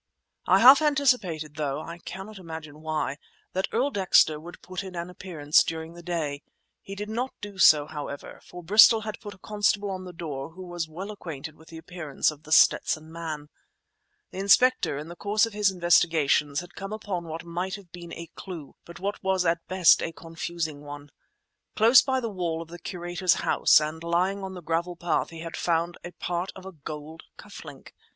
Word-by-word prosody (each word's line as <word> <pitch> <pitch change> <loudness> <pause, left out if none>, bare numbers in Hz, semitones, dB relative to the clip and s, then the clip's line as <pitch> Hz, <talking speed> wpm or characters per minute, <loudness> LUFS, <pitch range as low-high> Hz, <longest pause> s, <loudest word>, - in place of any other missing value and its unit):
I - - +6
half 270 +4 +9
anticipated, 245 - +1
though 145 -2 -2
I 170 +2 -8
cannot 195 +4 -8
imagine 160 -3 -9
why, 155 -3 -2 0.4
that 190 +1 0
Earl 265 +5 +1
Dexter 185 - +4
would 170 +3 -11
put 185 +1 -5
in 190 -2 -9
an 170 +1 -5
appearance, 160 -5 +2
during 160 0 -5
the 175 - -11
day. 160 -5 -3 0.4
He 195 - -8
did 210 +1 -5
not 240 +4 -3
do 205 -2 -9
so, 150 -5 +7
however, 145 -2 -7
for 180 0 -11
Bristol 220 +5 +7
had 215 -1 -6
put 205 -4 -9
a - - -21
constable 205 0 0
on 185 -1 -5
the 180 - -8
door 155 -4 -6
who 185 +2 -9
was 175 -2 -4
well 190 +6 -6
acquainted 160 -6 -8
with 160 - -19
the 165 - -10
appearance 160 -4 -2
of 150 -1 -13
The 155 - -14
Stetson 155 0 +4
Man. 155 -3 -6 0.8
The 185 - -7
inspector, 200 - +4
in 150 +2 -6
the 170 - -9
course 210 +4 +2
of 225 - -8
his 205 -1 +3
investigations, 165 -5 +2
had 175 - -13
come 195 +1 -6
upon 200 -5 -4
what 160 0 -6
might 175 +3 -3
have 195 -5 -13
been 175 -1 -10
a 170 0 -7
clue, 165 -7 -9
but 170 - -11
what 200 +3 -3
was 190 -2 +1
at 170 0 0
best 185 -2 +5
a 165 - -2
confusing 165 -2 -5
one. 145 0 -10 0.6
Close 230 +4 +7
by 265 -1 0
the 235 - -3
wall 170 -4 -2
of 165 - -19
the 175 +1 -9
curator's 175 +1 0
house - - +5
and 155 +2 -4
lying 185 +4 0
on 190 0 -6
the 180 - -9
gravel 170 +2 -1
path 170 0 -1
he 165 -1 -9
had 165 0 -6
found 170 0 -1
a 175 - -7
part 175 +2 -3
of 190 - -11
a 190 - -7
gold 155 0 -8 0.2
cuff - - -11
link. - - -12
175 Hz, 200 wpm, -26 LUFS, 160-190 Hz, 0.8 s, half